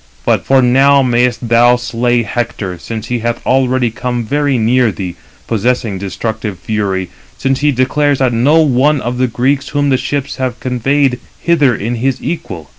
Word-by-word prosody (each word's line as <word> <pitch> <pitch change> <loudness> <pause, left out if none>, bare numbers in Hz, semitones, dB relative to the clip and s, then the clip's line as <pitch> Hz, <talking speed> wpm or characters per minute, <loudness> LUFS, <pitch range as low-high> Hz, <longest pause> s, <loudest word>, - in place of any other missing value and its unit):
For 135 -1 +4
now 135 +3 +4
mayest 120 -1 +1
thou 120 +1 +5
slay 120 0 0
Hector, 105 -5 -4
since 115 +3 -6
he 120 -1 -1
hath 120 +1 -3
already 130 -2 +1
come 120 0 -3
very 145 +2 0
near 120 +1 +2
thee, 90 -3 -6 0.3
possessing 115 -2 -1
destructive 105 +1 -4
fury; 100 -3 -2 0.3
since 135 0 0
he 150 0 +2
declares 140 +2 +1
that 130 -2 +1
no 145 +8 +4
one 145 0 +2
of 125 0 -4
the 130 - +2
Greeks 130 +4 0
whom 145 -1 0
the 130 - +3
ships 135 +2 -3
have 130 -3 -3
conveyed 130 +1 0 0.2
hither 150 -8 +3
is 115 +4 -3
his 130 +1 0
equal." 95 - -5
125 Hz, 165 wpm, -14 LUFS, 115-135 Hz, 0.3 s, thou